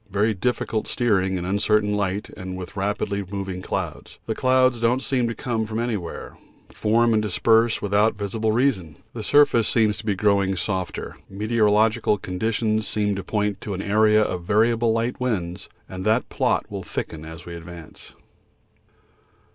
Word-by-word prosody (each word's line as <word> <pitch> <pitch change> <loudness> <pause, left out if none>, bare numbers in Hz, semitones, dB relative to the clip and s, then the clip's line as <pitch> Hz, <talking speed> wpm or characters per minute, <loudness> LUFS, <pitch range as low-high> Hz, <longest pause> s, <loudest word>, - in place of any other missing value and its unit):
Very 105 +3 +1
difficult 110 +1 -1
steering 95 -6 +1
in 90 - -4
uncertain 105 +2 +1
light 100 0 -2
and 95 0 -6
with 90 +1 -8
rapidly 100 0 -1
moving 95 -2 -4
clouds. - - -5
The - - -1
clouds 130 -1 +3
don't 120 +3 +1
seem 125 -3 0
to 115 - -3
come 115 -5 -2
from 110 0 -4
anywhere, 110 -8 -4 0.3
form 115 +2 +2
and 110 - +3
disperse 110 +2 +2
without 105 +2 +2
visible 110 +2 -1
reason. 110 - 0 0.2
The 115 - -5
surface 120 -2 +4
seems 110 -3 +2
to - - -8
be 100 - +1
growing 100 -1 +2
softer. 95 0 -3
The 95 - -13
meteorological 110 0 +2
conditions 110 +3 -1
seem 105 -1 0
to 95 - -5
point 105 0 -1
to 100 - -4
an 95 - -4
area 110 +1 +4
of 90 -4 -3
variable 115 +4 +2
light 115 +2 -1
winds, 95 -9 -3 0.2
and 95 0 -7
that 110 +4 +1
plot - - 0
will - - -4
thicken 80 -1 -5
as 80 +1 -10
we 85 - -8
advance. 85 -1 -11
105 Hz, 165 wpm, -23 LUFS, 95-115 Hz, 0.3 s, surface